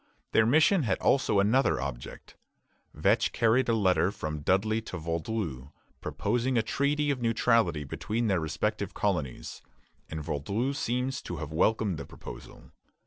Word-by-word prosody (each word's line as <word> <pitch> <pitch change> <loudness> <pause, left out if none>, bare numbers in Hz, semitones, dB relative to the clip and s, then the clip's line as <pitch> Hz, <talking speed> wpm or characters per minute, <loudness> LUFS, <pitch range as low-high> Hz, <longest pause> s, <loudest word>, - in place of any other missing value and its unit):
Their 110 - +4
mission 160 - +4
had 105 -9 0
also 130 -7 +2
another 115 +7 +3
object. - - -7 0.6
Vetch - - +2
carried 120 +3 +2
a 115 - +3
letter 95 -3 +3
from 75 -6 -5
Dudley 100 +8 +1
to - - -7
Vaudreuil, 80 - -3 0.3
proposing 125 +1 -1
a 115 - +3
treaty 145 +5 0
of 130 -3 -3
neutrality 115 -8 +2
between 110 - -3
their 95 -5 +2
respective 80 -1 -2
colonies, 70 -5 -2 0.5
and 80 -1 -5
Vaudreuil 100 - -2
seems 130 +1 -2
to 85 - -6
have 80 -1 -6
welcomed 105 +1 +1
the 70 - -6
proposal. - - -11
110 Hz, 140 wpm, -29 LUFS, 80-120 Hz, 0.6 s, Their